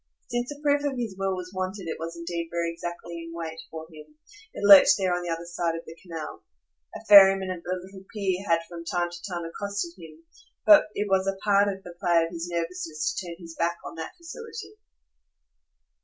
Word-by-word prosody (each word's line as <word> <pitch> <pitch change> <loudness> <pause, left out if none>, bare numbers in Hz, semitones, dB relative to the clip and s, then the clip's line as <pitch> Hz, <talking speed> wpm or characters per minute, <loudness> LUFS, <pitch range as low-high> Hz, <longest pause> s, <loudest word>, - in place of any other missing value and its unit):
Since 240 +1 -1
a 290 0 -7
proof 290 0 +3
of 280 -3 -1
his 230 -5 -3
will 195 0 -1
was 180 0 -7
wanted 185 0 -4
it 160 - -4
was 165 +1 -5
indeed 170 0 -4
very 170 0 -1
exactly 170 0 -6
in 165 - -9
wait 165 -1 -5
for 160 0 -7
him 150 0 -14 0.4
it - - -7
lurked 200 -1 +10
there 190 -2 +1
on 175 - -1
the 175 - -5
other 165 +1 -3
side 170 -1 -2
of 165 - -7
the 160 - -10
Canal. 165 -4 -7 0.5
A - - -9
ferryman 195 -2 +8
at 180 -2 -5
the 180 +1 -3
little 190 0 -12
pier 195 -3 -1
had 165 0 +3
from 170 -1 -8
time 175 +1 -1
to 175 0 -10
time 175 -1 -3
accosted 200 +1 -4
him; 160 -1 -13 0.4
but 310 -6 +8
it 205 - -1
was 190 -1 +2
a 195 0 -1
part 200 0 +5
of 195 -1 -3
the 175 - -10
play 170 -1 +3
of 165 - -7
his 170 0 -5
nervousness 165 -3 -2
to 185 - -5
turn 170 - -6
his 165 -2 -11
back 170 0 0
on - - -7
that 165 - -7
facility. 445 +5 -9
175 Hz, 215 wpm, -26 LUFS, 170-195 Hz, 0.5 s, lurked